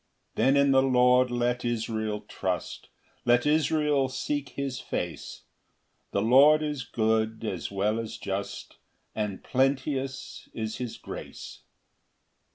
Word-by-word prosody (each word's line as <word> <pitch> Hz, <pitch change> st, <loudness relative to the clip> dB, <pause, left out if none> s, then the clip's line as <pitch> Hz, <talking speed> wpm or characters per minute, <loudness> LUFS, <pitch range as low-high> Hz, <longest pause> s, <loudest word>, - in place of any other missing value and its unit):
] -, -, -46 dB
7 135 Hz, +1 st, +3 dB
[Then 140 Hz, -, +5 dB
in 140 Hz, -, +3 dB
the 135 Hz, 0 st, +5 dB
Lord 125 Hz, -1 st, +4 dB
let 120 Hz, 0 st, 0 dB
Israel 110 Hz, -3 st, -2 dB
trust, -, -, -4 dB, 0.3 s
Let 120 Hz, +1 st, +3 dB
Israel 150 Hz, -2 st, +2 dB
seek 145 Hz, +2 st, -3 dB
his 135 Hz, -2 st, -4 dB
face; -, -, -5 dB, 0.7 s
The 100 Hz, -, 0 dB
Lord 145 Hz, +6 st, +6 dB
is 150 Hz, -4 st, -3 dB
good 110 Hz, -1 st, 0 dB
as 95 Hz, -5 st, -3 dB
well 105 Hz, +3 st, 0 dB
as 115 Hz, -1 st, -5 dB
just, 100 Hz, 0 st, -5 dB, 0.4 s
And 105 Hz, -3 st, -3 dB
plenteous 135 Hz, 0 st, -1 dB
is 110 Hz, -1 st, -3 dB
his 125 Hz, -3 st, -5 dB
grace. -, -, -9 dB
125 Hz, 130 wpm, -27 LUFS, 110-135 Hz, 0.7 s, Lord